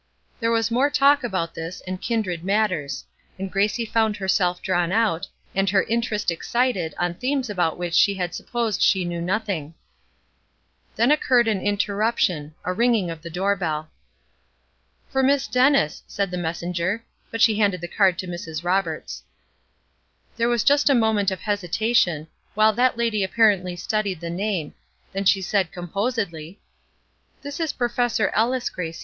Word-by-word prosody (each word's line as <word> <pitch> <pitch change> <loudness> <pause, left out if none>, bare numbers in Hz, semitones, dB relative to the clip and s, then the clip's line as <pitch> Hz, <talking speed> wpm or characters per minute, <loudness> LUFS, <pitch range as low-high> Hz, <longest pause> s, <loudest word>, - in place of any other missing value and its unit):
There 230 -1 0
was 230 0 +1
more 260 +5 +3
talk 285 -1 +4
about 185 -8 -2
this 165 +2 -6
and 185 0 -5
kindred 190 -8 -2
matters; 190 -7 0 0.3
and 190 0 -5
Gracie 210 +4 +1
found 220 -1 +1
herself 185 -2 +1
drawn 175 -2 0
out, 200 -4 +1 0.3
and 195 0 +1
her 195 0 +3
interest 225 -4 -1
excited 195 -1 -1
on 175 0 0
themes 255 +3 -2
about 175 -5 0
which 175 -1 -4
she 200 +3 +4
had 180 -2 -3
supposed 235 -4 -2
she 190 -2 +3
knew 170 -1 -3
nothing. 180 -5 -2 1.2
Then 235 +5 +3
occurred 250 -5 +3
an 210 -4 0
interruption, 200 -6 0
a 180 - -1
ringing 225 -4 +2
of 165 -1 -8
the 170 - -8
door 190 +4 0
bell. 155 -4 -3 1.2
"For 265 - +1
Miss 275 +1 +2
Dennis," 255 - +3
said 200 -2 -2
the - - -3
messenger; 175 +4 -2 0.2
but 230 - -5
she 220 -1 +4
handed 200 -4 +2
the 175 - -5
card 185 -1 +2
to 185 - -4
Mrs. 165 -2 -6
Roberts. 175 -3 -1 1.1
There 235 0 +1
was 240 -2 +1
just 285 +1 +4
a 275 - +5
moment 220 -4 +2
of 190 -3 -5
hesitation, 205 -4 +1 0.3
while 215 +1 +4
that 245 +2 +2
lady 230 -4 +1
apparently 190 -3 +2
studied 200 0 -2
the 170 0 -5
name, 185 -4 -2 0.4
then 195 +1 -2
she 195 0 +4
said, 185 -3 0
composedly: 180 -2 -3 0.8
"This 285 +2 -6
is 325 -3 0
Professor 240 -4 0
Ellis, 245 +3 +1
Gracie. 165 -2 -5
200 Hz, 155 wpm, -23 LUFS, 175-230 Hz, 1.2 s, a